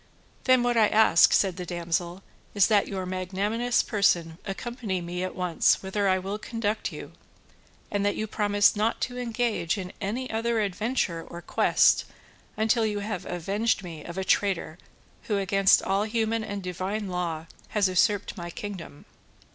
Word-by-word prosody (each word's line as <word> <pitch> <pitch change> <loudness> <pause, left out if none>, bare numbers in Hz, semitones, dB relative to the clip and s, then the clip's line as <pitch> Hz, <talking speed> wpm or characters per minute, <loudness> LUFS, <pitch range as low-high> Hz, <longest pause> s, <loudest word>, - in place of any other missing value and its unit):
"Then 255 -1 +5
what 245 -1 +1
I 220 -2 +6
ask," 215 -6 +5
said 190 -2 +2
the 180 - -5
damsel, 175 +1 -2 0.3
"is 200 -2 +6
that 210 -2 +3
your 190 -2 -4
magnanimous 200 +6 0
person 170 -6 +1
accompany 210 -1 -4
me 175 +1 -4
at 185 - -4
once 180 0 +2
whither 200 +1 -1
I 185 - +3
will 195 +3 -4
conduct 220 -2 -2
you, - - -9 0.8
and 205 -1 0
that 205 0 +1
you 215 - -2
promise 205 -1 +2
not 215 +2 0
to 250 0 -3
engage 230 -6 -1
in 185 -2 -6
any 230 +6 -2
other 225 +1 0
adventure 200 -4 -1
or 170 0 -9
quest - - +3 0.5
until 225 +2 +2
you 210 -2 -1
have 200 -3 -4
avenged 195 +5 -1
me 165 -4 -8
of 170 +1 -8
a 190 - -1
traitor 190 -3 0 0.5
who 210 - 0
against 195 0 +4
all 195 +2 +1
human 225 0 0
and 205 -2 -5
divine 190 +4 -3
law, 170 -3 -3 0.2
has 205 -2 +2
usurped 200 +2 +1
my 175 -3 -6
kingdom." 180 -5 -8
200 Hz, 165 wpm, -26 LUFS, 180-220 Hz, 0.8 s, I